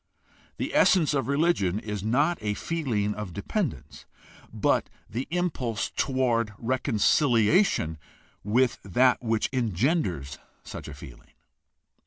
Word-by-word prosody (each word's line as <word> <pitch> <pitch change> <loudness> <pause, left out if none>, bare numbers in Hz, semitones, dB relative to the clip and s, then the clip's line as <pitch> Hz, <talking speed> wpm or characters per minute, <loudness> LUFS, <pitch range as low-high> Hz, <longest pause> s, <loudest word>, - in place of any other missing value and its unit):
The - - -3
essence 165 -6 +4
of 135 -2 0
religion 140 - +1
is 105 -2 -4
not 140 - +1
a 105 -1 -1
feeling 115 -10 -1
of 105 -5 -6
dependence, 150 - -4 0.5
but - - +1 0.2
the 120 +5 -4
impulse 150 - -2
toward 120 -5 0
reconciliation 120 - +2 0.4
with 120 +5 +2
that 125 +6 +2
which 115 -2 0
engenders 105 - -1 0.2
such - - -8
a 75 - -8
feeling. - - -13
120 Hz, 110 wpm, -26 LUFS, 105-140 Hz, 0.5 s, essence